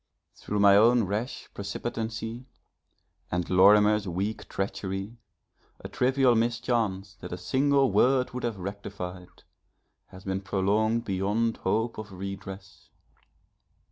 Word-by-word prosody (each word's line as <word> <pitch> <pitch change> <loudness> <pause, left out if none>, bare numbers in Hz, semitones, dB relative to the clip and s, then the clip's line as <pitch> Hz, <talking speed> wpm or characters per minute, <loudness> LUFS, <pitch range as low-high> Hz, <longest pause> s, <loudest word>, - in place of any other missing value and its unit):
Through 105 - -4
my 100 -1 +7
own 115 +2 +5
rash 105 +6 -3
precipitancy 115 +3 -5 0.8
and 90 -1 -2
Lorimer's 105 +2 +5
weak 95 +5 -3
treachery, 95 +3 -4 0.6
a - - -7
trivial 130 0 +3
mischance 115 -4 -1
that - - -8
a 90 - -4
single 135 +8 +2
word 130 0 +3
would 125 - -5
have 115 -4 -2
rectified, 95 -2 -7 0.6
has 95 0 -13
been 95 0 -2
prolonged 105 +4 +1
beyond 105 +4 0
hope 110 +4 -1
of 105 -1 -8
redress. 95 +1 -8
105 Hz, 110 wpm, -27 LUFS, 95-115 Hz, 0.8 s, my